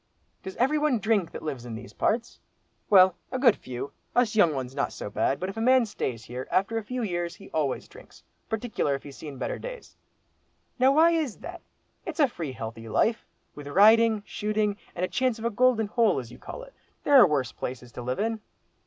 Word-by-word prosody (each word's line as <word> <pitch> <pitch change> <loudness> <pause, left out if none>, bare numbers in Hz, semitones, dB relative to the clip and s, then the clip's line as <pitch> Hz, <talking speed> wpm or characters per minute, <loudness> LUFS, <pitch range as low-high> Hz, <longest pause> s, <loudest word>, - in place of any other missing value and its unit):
"Does 190 - -8
every 280 +5 +2
one 295 -4 +2
drink 215 -5 +1
that - - -8
lives 140 -6 -4
in 120 -2 -7
these 120 +2 -10
parts?" 235 +2 -1 0.5
"Well, 185 -2 +7 0.2
a 255 - -1
good 250 -4 +5
few. 130 +2 -7 0.2
Us 245 -3 +2
young 175 -7 +5
ones 130 -1 -4
not - - -1
so 105 - -7
bad, 135 - 0
but 185 - -3
if 195 - -7
a - - -2
man 255 +1 +5
stays 125 - -4
here, 125 +3 -6
after 210 +4 +1
a - - -8
few 250 +3 -4
years 175 -3 -2
he - - -14
always 145 -4 -1
drinks, - - -16 0.3
partickler 220 - -1
if 135 - -8
he's 140 -2 -10
seen 145 -4 -8
better - - -3
days." - - -9 0.8
"Now 260 +2 +5
why 320 +4 +5
is 315 -9 -1
that? 350 0 -8 0.4
It's 330 -2 -7
a 290 - +6
free 165 - -6
healthy 115 -1 -7
life, 225 - +1 0.3
with 145 -1 -10
riding, 215 +5 +5
shooting, 210 -1 -1 0.2
and 180 - 0
a - - -4
chance 255 +1 0
of 225 - -7
a 235 - +1
golden 240 0 +3
hole, 215 -1 +2
as 120 -3 -5
you 120 - -13
call - - -8
it. - - -14 0.3
There 290 - +1
are 245 -7 +9
worse 140 -6 0
places 125 -1 -6
to 125 - -8
live 125 +1 -3
in." 225 0 -1
210 Hz, 215 wpm, -27 LUFS, -, 0.8 s, are